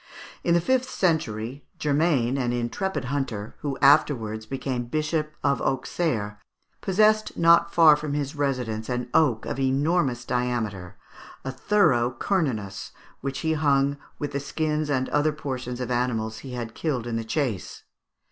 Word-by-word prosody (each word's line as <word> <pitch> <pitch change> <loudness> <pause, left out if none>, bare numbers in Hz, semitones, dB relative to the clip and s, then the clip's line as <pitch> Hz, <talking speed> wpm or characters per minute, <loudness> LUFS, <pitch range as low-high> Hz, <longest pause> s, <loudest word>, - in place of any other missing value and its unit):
In 170 - +3
the 170 - +3
fifth 260 +5 +1
century, 140 - -1
Germain, 145 -4 +2
an 125 -3 0
intrepid 125 - -2
hunter, 125 -6 -3
who 140 -2 -3
afterwards 115 -7 +3
became 130 -2 -3
Bishop 155 +3 -1
of 140 -2 +2
Auxerre, 125 -6 -1 0.4
possessed 215 +2 +2
not 170 0 +5
far 160 -3 +7
from 150 -1 -4
his 145 0 -2
residence 125 -6 -2
an 125 -1 -2
oak 125 -9 +3
of - - -4
enormous 135 -1 +1
diameter, 110 -7 -2 0.5
a 135 - -2
thorough 130 - +2
Cernunnos, 115 - -1 0.3
which 135 0 -4
he 160 0 +1
hung 140 -2 +2 0.2
with 145 - -4
the 140 - -2
skins 150 +2 -1
and 130 -2 +1
other 150 +1 +2
portions 130 -4 -5
of 125 0 -3
animals 115 -3 -1
he 130 -2 -8
had 120 -2 -5
killed 135 -8 -2
in 120 -1 -3
the 115 - -1
chase. 115 - -3
135 Hz, 145 wpm, -25 LUFS, 120-155 Hz, 0.5 s, far